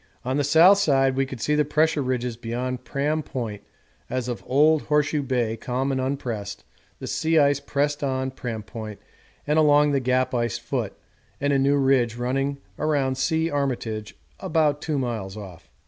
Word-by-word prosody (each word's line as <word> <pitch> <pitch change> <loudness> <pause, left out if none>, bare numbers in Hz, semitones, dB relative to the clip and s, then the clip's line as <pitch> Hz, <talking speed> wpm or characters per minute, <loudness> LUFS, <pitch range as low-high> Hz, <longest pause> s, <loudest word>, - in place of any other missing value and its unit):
On 130 +2 0
the 145 - +1
south 170 +8 +6
side 135 -7 +3
we 135 0 +1
could 130 -2 -7
see 150 - 0
the 150 0 +3
Pressure 150 +1 +1
Ridges 125 -2 -2
beyond 120 +2 -4
Pram 145 +5 -1
Point 115 -8 -5 0.5
as 130 -1 -2
of 120 -2 -4
old 150 +3 +4
Horseshoe 150 0 +1
Bay 120 -4 -1
calm 130 +4 -2
and 130 -1 -1
unpressed 115 -7 -4 0.3
the - - -8
sea 160 +1 0
ice 140 -2 +4
pressed 145 +1 -1
on 130 -1 -1
Pram 115 -4 -5
Point 110 -1 -8 0.5
and 150 +2 +2
along 150 -1 +5
the 140 - +2
Gap 130 0 +1
ice 120 -3 0
foot, - - -3 0.5
and 145 0 +1
a 135 - +3
new 140 +1 +3
ridge 130 -4 +2
running 135 +3 -1 0.2
around 140 -4 +1
C. 160 +3 +1
Armitage 120 -7 -3 0.2
about 150 -2 +1
2 155 -2 -2
miles 110 -6 -3
off. 95 -5 -10
135 Hz, 175 wpm, -24 LUFS, 120-145 Hz, 0.5 s, south